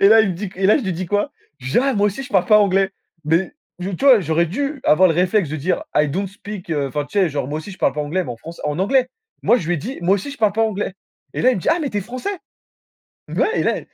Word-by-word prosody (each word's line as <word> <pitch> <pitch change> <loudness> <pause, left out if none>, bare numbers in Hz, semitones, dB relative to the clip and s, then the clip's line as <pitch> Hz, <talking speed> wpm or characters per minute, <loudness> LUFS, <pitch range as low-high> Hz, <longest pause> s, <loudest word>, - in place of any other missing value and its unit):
Et 195 - +7
là, 220 +1 +7
il 200 - +1
me - - -3
dit 195 +2 -5
qu 180 - -16
et 190 - +2
là, 210 - +6
je 280 - -1
lui 190 -3 -2
dis 180 +2 -4
quoi? 205 +9 0 0.3
Je 130 +1 -6
dis: - - +3
«Ah, 270 0 +1
moi 205 0 +3
aussi, 240 +7 -3
je 275 - -11
parle 190 -3 +2
pas 215 -1 +6
anglais» 195 -1 +3 0.3
mais 165 - +1 0.3
d 180 0 -4
tu - - -4
vois? 260 -5 +8
J'aurais 170 -1 +1
dû 275 - -3
avoir 185 +5 +5
le 165 - +1
réflexe 180 -1 +2
de 155 - -4
dire: 170 +6 -1
«I 150 0 +3
don't 190 +7 -2
speak», 205 -2 -9
heu, 145 -3 0
enfin, 145 +1 -2
tu 200 +7 -1
sais, 180 - +3
genre: 140 -2 -3
«Moi 150 - -3
aussi, 160 +6 -8
je 190 - -11
parle - - +2
pas 150 - -3
anglais» 175 +5 -1
mais 125 - -6
en - - -10
franç 165 +8 -10
en 150 0 -1
anglais. 255 +5 +3 0.4
Moi, 240 - +5
je 170 -7 -4
lui 175 - +2
ai - - -1
dit: 240 - -6
«Moi 185 +3 +4
aussi 275 +9 -6
je - - -10
parle 215 -3 +3
pas 225 +1 +2
anglais» 205 -3 -2 0.4
et - - -2
là, 255 - +6
il - - -1
me - - -3
dit: - - -2
«Ah 335 - +2
mais 290 - -1
tu 205 - -1
es - - -1
Français?» 255 - -5 0.9
mais - - -3
ouais 450 - +1
et - - +1
là - - +1
195 Hz, 325 wpm, -20 LUFS, 170-220 Hz, 0.9 s, vois